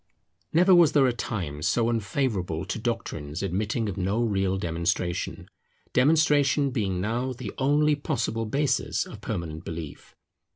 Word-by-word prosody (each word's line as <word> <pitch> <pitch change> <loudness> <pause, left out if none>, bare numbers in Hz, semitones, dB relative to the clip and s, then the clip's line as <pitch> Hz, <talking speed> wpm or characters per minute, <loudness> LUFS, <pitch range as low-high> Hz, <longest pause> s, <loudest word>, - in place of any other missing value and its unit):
Never 180 +3 +5
was 170 -4 +6
there 140 -3 +5
a 125 - +2
time 90 -11 -4
so 115 +6 +2
unfavourable 105 - -1
to - - -4
doctrines 90 -9 -3
admitting 105 +5 -1
of 100 - -4
no 100 +5 0
real 95 -4 0
demonstration: 85 0 -2 0.5
demonstration 145 0 +3
being 100 -7 -1
now 120 +6 -1
the 120 -5 -7
only 145 +3 +3
possible 115 -6 -2
basis 140 +5 0
of - - -11
permanent 80 -2 -4
belief. 80 -3 -8
110 Hz, 135 wpm, -26 LUFS, 90-135 Hz, 0.5 s, was